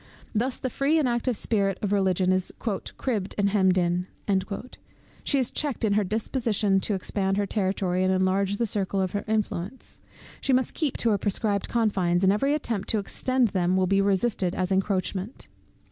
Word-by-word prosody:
Thus 240 +4 0
the 255 - -4
free 285 +6 +2
and 300 -5 +2
active 240 -1 0
spirit 200 -4 0
of 205 - 0
Religion 190 -2 +2
is 185 -1 +1
"cribbed 215 -1 -3
and 200 -1 +2
hemmed 190 -2 +3
in;" 175 0 +1 1.2
she 285 - +2
is 255 -3 0
checked 285 -6 -1
in 205 - +2
her 210 +1 +3
disposition 215 -1 0
to 205 +1 -1
expand 195 +1 -1
her 205 - +1
territory, 190 -2 0
and 185 - +2
enlarge 190 +1 +1
the 235 - +1
circle 195 -2 -1
of 185 -2 0
her 205 - -2
influence. 215 +1 -3 0.4
She 270 - +1
must 255 0 +1
keep 305 -6 -1
to 230 - +1
her 205 - +1
prescribed 205 0 -1
confines, 195 -6 +1
and 190 +1 +5
every 275 +8 +1
attempt 230 -9 -2
to 220 - +2
extend 255 +4 0
them 185 -1 +1
will 190 - +3
be 195 +2 +2
resisted 195 -2 +1
as 185 0 -1
an 190 - +3
encroachment. 195 +2 -2
200 Hz, 185 wpm, -26 LUFS, 190-230 Hz, 1.2 s, and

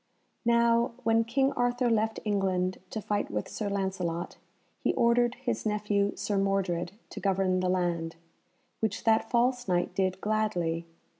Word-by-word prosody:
Now, 235 +1 +3
when 225 0 +3
King 270 +4 +2
Arthur 245 0 +1
left 225 -1 +1
England 190 -3 0
to 220 - -5
fight 205 -1 -1
with 105 0 -3
Sir 210 -2 -3
Lancelot, 190 -4 -2 0.4
he - - 0
ordered 235 +1 +3
his 240 -3 -3
nephew 210 -1 0
Sir 205 -2 -1
Mordred 190 -3 0 0.2
to - - -6
govern 190 -1 +1
the 185 0 0
land, 170 -3 0 0.6
which 220 -3 -1
that 225 0 +3
false 245 0 +1
Knight 175 -1 +1
did 185 -1 0
gladly. 180 -6 -1
205 Hz, 145 wpm, -29 LUFS, 185-230 Hz, 0.6 s, Now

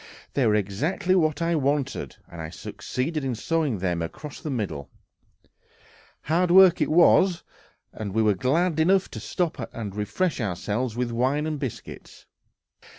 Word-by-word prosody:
They 135 -4 +2
were 105 - +3
exactly 145 - 0
what 165 -2 +2
I 170 +1 +1
wanted, 140 -2 -1
and 85 - -9
I 80 - -5
succeeded 145 - -4
in 130 -3 -1
sawing 150 -1 0
them 90 -2 -1
across 140 - -7
the 155 - -5
middle. 95 - -3 1.3
Hard 170 +4 +1
work 185 0 +7
it - - +2
was, 175 +2 +4 0.5
and 105 -2 -5
we 110 +3 +1
were 105 -1 +4
glad 155 - +1
enough 190 +4 +3
to - - -6
stop 165 -9 -3
and 105 -4 -6
refresh 140 - -1
ourselves 105 +4 -2
with 125 -1 -1
wine 130 +6 0
and 155 -2 -3
biscuits. 135 -6 -8
135 Hz, 150 wpm, -25 LUFS, 105-165 Hz, 1.3 s, work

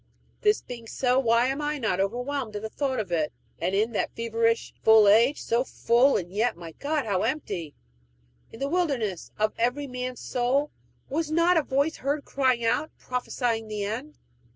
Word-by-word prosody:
This 420 0 +3
being 235 -2 -8
so, 250 +2 +1
why 235 -1 +3
am 270 +3 -1
I 295 0 -1
not 220 -8 -1
overwhelmed 245 +3 -2
at 205 - -4
the 220 - -3
thought 265 -4 -1
of 200 -5 -4
it? 155 -3 0 0.3
In 195 +6 +1
that 215 - -2
feverish, 230 0 0
full 220 -2 +7
age 230 +7 +5
so 235 +2 +1
full, 255 +1 +3
and 175 -1 -5
yet, 220 -1 +1
my 170 -1 -8
God, 290 - -2
how 195 -4 0
empty! 200 - -3 0.8
in 225 - -11
the 275 - -1
wilderness 275 - -1
of 215 0 +1
every 250 +5 +1
man's 250 -1 -5
soul, 260 +4 0 0.4
was 315 +2 -2
not 335 +3 +3
a 325 - +4
voice 280 +3 0
heard 285 +2 -2
crying 255 -4 +1
out, 245 +7 +1
prophesying 245 -2 -2
the 210 -1 -3
end? 250 +9 -5
245 Hz, 175 wpm, -26 LUFS, 220-280 Hz, 0.8 s, full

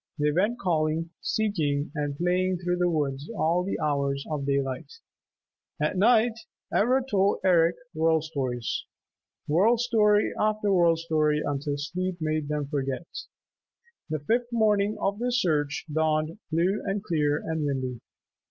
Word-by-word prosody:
They 150 0 +2
went 205 +9 +1
calling, 165 -3 0
seeking 155 -11 -1
and 145 -2 -3
playing 180 +2 +1
through 180 0 -1
the 180 0 +2
woods 145 -3 -2
all 170 +2 +2
the 195 - -3
hours 140 -2 -1
of 140 -2 -2
daylight. 135 -2 -1 0.9
At - - 0
night 225 +3 +3 0.3
Ivra 255 +5 +3
told 200 -5 +1
Eric 170 -2 +4 0.2
World 160 0 +2
Stories, 130 -7 -3 0.6
World 205 +10 +3
Story 215 -3 +3
after 215 -1 +1
World 170 -2 +4
Story 155 -2 +1
until 145 0 -2
sleep 180 +5 -3
made 155 -2 -1
them 150 -1 -2
forget. 140 +1 -3 1.0
The 155 - -1
fifth 235 - -1
morning 210 -2 +2
of 200 +1 -1
their 245 +1 0
search 155 - 0
dawned 155 +3 0
blue 180 +6 +1
and 200 0 -2
clear 150 -6 +1
and 160 0 -3
windy. 130 -4 -2
165 Hz, 140 wpm, -27 LUFS, 145-200 Hz, 1.0 s, Eric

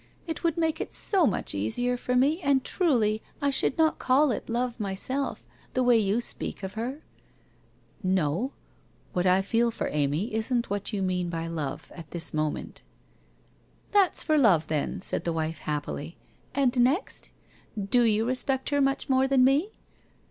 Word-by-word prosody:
It 325 0 -5
would 335 -1 +1
make 320 -2 0
it - - -5
so 375 -7 +2
much - - -1
easier 180 - 0
for 250 +1 -2
me, 290 +8 +3
and 275 -4 +2
truly, 225 - +1 0.2
I 280 0 +1
should 270 - 0
not 320 -1 +2
call 270 +2 +3
it 225 - -4
Love, 240 +1 -1
myself, 215 +7 -3 0.3
the 255 - +2
way 245 -1 +5
you 215 +1 +2
speak 220 - -5
of 190 0 -4
her? 250 +8 -4 0.4
' - - -35
' 220 - -33 0.2
No, 165 - -1 0.6
what 180 +1 +1
I 185 +1 +4
feel 230 +4 +2
for 230 - -3
Amy 150 - 0
isn't 235 +1 -1
what 205 +1 -2
you 200 -3 -1
mean 180 -1 -1
by 165 -1 -3
love, 160 -5 -5
at 165 -3 -10
this 170 -1 -2
moment.' 155 -1 -3 1.1
1 410 - +6
That's 370 - -3
for 310 -1 +3
love, 190 - +4
then,' 155 +5 -1
said - - -1
the 170 - -1
wife, 160 -1 -2
happily. 150 +1 -4 0.2
' - - -27
And 265 -2 +2
next? 270 - 0 0.5
Do 205 +5 +2
you 220 -1 +3
respect 260 +1 0
her 285 -1 +2
much 275 0 +1
more 265 0 +3
than 265 -1 +4
me 280 +9 +3
235 Hz, 180 wpm, -27 LUFS, 185-270 Hz, 1.1 s, 1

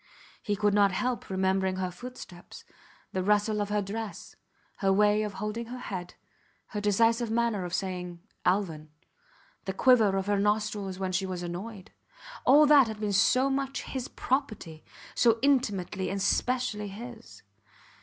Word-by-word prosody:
He 205 - -1
could 205 0 +1
not 200 -1 +4
help 250 +6 -2
remembering 190 0 +1
her 185 -1 -2
footsteps, 180 -3 -11 0.5
the 185 - 0
rustle 210 +2 +2
of 205 - -2
her 210 0 0
dress, 215 +2 -6 0.4
her 195 -1 +1
way 210 +2 +4
of 210 -1 -3
holding 210 +4 -4
her 250 +2 -7
head, 185 -7 -6 0.5
her 210 - -4
decisive 225 +3 +2
manner 225 -4 0
of 175 - -6
saying 180 -2 -4 0.2
Alvan, 170 -5 0 0.8
the 190 - -2
quiver 220 -3 +4
of 190 - -1
her 205 0 +1
nostrils 210 -2 -1
when 190 -1 -2
she 190 +1 -1
was 180 -1 -4
annoyed. 185 +4 -7 0.5
All 290 +4 +7
that 285 -4 +6
had 220 -1 -6
been 210 -1 -1
so 255 +7 +4
much 270 0 -2
his 260 -2 -5
property, 215 - -3 0.3
so 230 -2 +4
intimately 205 -9 +1
and 195 - -2
specially 220 +1 0
his! 230 +3 -10
205 Hz, 155 wpm, -28 LUFS, 190-230 Hz, 0.8 s, All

